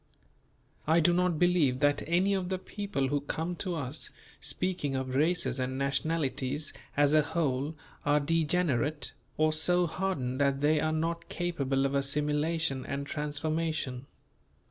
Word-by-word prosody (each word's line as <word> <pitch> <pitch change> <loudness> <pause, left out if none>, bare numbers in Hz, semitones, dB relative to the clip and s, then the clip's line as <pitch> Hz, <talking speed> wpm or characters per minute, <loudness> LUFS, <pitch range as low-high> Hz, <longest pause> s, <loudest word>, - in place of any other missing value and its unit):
I 160 +2 +5
do 170 +2 +4
not 180 -2 +2
believe 165 -7 +3
that 145 -1 +3
any 180 +4 +3
of 185 -2 -1
the 190 - 0
people 185 -8 -3
who 145 -1 0
come 165 +5 -3
to 180 -1 -2
us, 145 0 -3 0.3
speaking 180 -7 -2
of 130 -1 -2
races 140 -3 +2
and 130 +1 -2
nationalities 140 0 -1 0.2
as 145 0 +4
a 155 - +6
whole, 145 -1 -1 0.3
are 145 0 +3
degenerate, 155 -3 +1 0.3
or 155 0 +3
so 175 +3 +3
hardened 150 -8 -2
that 140 -1 +2
they 150 +1 +3
are 155 +1 +1
not 165 +2 -2
capable 140 -6 0
of 135 - 0
assimilation 150 +1 0
and 140 +2 -4
transformation. 150 -2 -2
150 Hz, 145 wpm, -30 LUFS, 140-170 Hz, 0.3 s, a